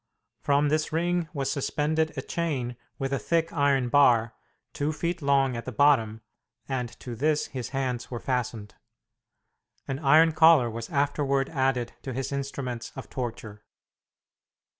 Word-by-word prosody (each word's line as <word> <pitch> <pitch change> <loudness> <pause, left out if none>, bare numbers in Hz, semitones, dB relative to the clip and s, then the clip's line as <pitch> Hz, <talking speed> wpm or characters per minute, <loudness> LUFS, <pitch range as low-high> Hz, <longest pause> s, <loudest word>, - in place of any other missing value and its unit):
From 145 +1 +2
this 155 +1 0
ring 170 +1 0
was 140 -3 -2
suspended 155 +3 0
a - - -3
chain 135 -8 -2 0.2
with 135 0 -2
a 140 - 0
thick 165 -1 0
iron 140 -4 +2
bar, 120 -5 +4 0.4
two 145 +2 -1
feet 170 +2 -3
long 135 -2 +2
at 115 - -5
the 130 - -4
bottom, 115 -4 +3 0.5
and 125 -3 -2
to 120 -2 -6
this 150 +4 +1
his 130 -3 -5
hands 130 -3 -3
were 120 - -5
fastened. 125 -5 -3 1.1
An 135 0 -3
iron 155 +3 +5
collar 155 -6 +5
was 115 0 -6
afterward 140 -1 0
added 130 -4 0
to 130 - -5
his 135 +3 -3
instruments 135 -3 -4
of 135 - -9
torture. 115 -4 -6
135 Hz, 145 wpm, -27 LUFS, 125-150 Hz, 1.1 s, iron